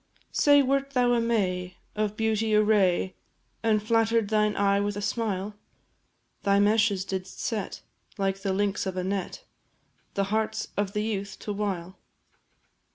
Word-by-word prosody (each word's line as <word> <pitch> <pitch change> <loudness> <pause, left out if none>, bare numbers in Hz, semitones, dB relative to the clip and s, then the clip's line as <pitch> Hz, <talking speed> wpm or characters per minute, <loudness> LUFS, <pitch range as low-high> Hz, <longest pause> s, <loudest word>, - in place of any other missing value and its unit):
Say, 285 -1 +5
wert 275 +1 0
thou 245 -1 +3
a 235 - +2
May, 185 -6 0 0.2
of 210 0 -1
beauty 220 -1 +1
a 210 - +5
ray, 190 -3 +2 0.5
And 215 -2 +2
flatter'd 225 -1 +2
thine 210 -1 +2
eye 200 0 +3
with 205 0 -1
a - - -2
smile? 205 -2 -2 0.9
Thy 200 0 +3
meshes 205 -2 +3
didst 190 -1 -5
set, 215 -5 -3 0.3
like 195 -1 -1
the 195 - -1
links 200 0 0
of 185 -1 -4
a 185 - -1
net, 195 - -3 0.7
The 200 - +2
hearts 220 0 -1
of 200 -1 -1
the 210 - 0
youth 200 -2 -3
to 210 - -3
wile? 190 -3 -3
210 Hz, 155 wpm, -27 LUFS, 195-220 Hz, 0.9 s, Say